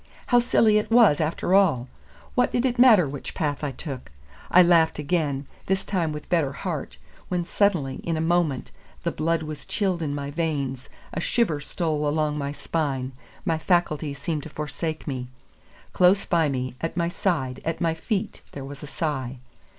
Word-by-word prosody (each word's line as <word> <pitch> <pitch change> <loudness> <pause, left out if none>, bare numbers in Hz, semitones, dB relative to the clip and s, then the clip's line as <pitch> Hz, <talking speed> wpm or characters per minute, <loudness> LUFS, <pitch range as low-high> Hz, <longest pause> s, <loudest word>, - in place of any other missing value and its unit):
How 245 - +5
silly 220 -3 +4
it 210 - -4
was, 225 -10 +6
after 160 +3 0
all! 160 -11 +4 0.5
What 250 - +2
did 245 +1 +1
it 245 -2 0
matter 220 - +7
which 140 0 -7
path 150 -2 -1
I 145 - 0
took? 135 - -7 0.4
I 180 - +7
laughed 165 -2 +4
again, 145 -2 -1 0.2
this 190 0 0
time 175 -5 0
with 150 0 -7
better 155 -6 +1
heart, - - -4 0.3
when 175 -1 -1
suddenly, 175 -9 +1
in 165 -1 -2
a - - -1
moment, 160 -4 +1 0.3
the - - 0
blood 165 +1 0
was 150 -2 -6
chilled 190 -5 -1
in 145 -3 -2
my 140 0 -4
veins, 140 -5 -2 0.2
a - - -2
shiver 175 -9 +1
stole 155 -1 -1
along 150 0 0
my 140 0 -2
spine, 140 -3 -2 0.3
my 165 -4 +1
faculties 155 -4 +1
seemed 150 +2 -2
to 160 - -9
forsake 155 +1 -4
me. 130 -3 -3 0.7
Close 185 +2 +4
by 165 -4 +2
me, 130 -2 -2
at 165 +1 -3
my 170 -1 +2
side, 150 -8 -1
at 165 0 -2
my 165 -1 +1
feet, 205 +5 -3
there 140 -1 -6
was 140 +1 -9
a 150 - -7
sigh. 135 -5 -3
160 Hz, 180 wpm, -25 LUFS, 145-175 Hz, 0.7 s, matter